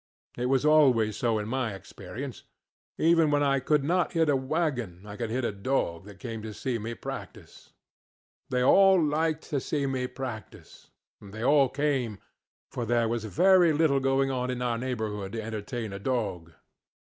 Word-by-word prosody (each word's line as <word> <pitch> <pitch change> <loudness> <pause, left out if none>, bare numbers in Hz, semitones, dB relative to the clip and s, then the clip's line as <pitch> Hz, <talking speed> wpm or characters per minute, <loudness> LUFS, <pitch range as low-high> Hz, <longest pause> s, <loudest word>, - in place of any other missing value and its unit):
It 125 +1 -2
was 135 +2 +2
always 130 -9 +4
so 115 -2 0
in 105 0 -3
my 120 -4 -2
experience. 95 - -8 0.6
Even 165 -1 +4
when 145 0 +2
I 140 -1 +2
could 145 +2 +1
not 175 +5 +1
hit 165 -2 +2
a 145 - +4
wagon 130 - -2
I 105 -1 -8
could 115 +1 -4
hit 125 +2 -1
a - - 0
dog 100 -5 -2
that 100 -1 -12
came 115 -2 -6
to 110 -1 -7
see 125 0 -2
me 115 +2 -5
practice. - - -9 0.8
They 125 0 +1
all 195 +6 +6
liked 160 0 0
to 145 - +1
see 140 +1 -2
me 130 -2 -1
practice, 125 -4 -9 0.3
and 100 - -12
they 110 +2 -6
all 140 0 +4
came, 135 -7 -1 0.5
for 120 - -3
there 115 0 +1
was 115 -1 -2
very 175 - +4
little 150 -2 +3
going 135 0 +1
on 125 -1 -2
in 125 -1 -2
our 120 -2 -1
neighborhood 110 -6 -4
to 115 - -3
entertain 110 0 -5
a 100 - -6
dog. 100 -8 -2
125 Hz, 180 wpm, -28 LUFS, 110-145 Hz, 0.8 s, all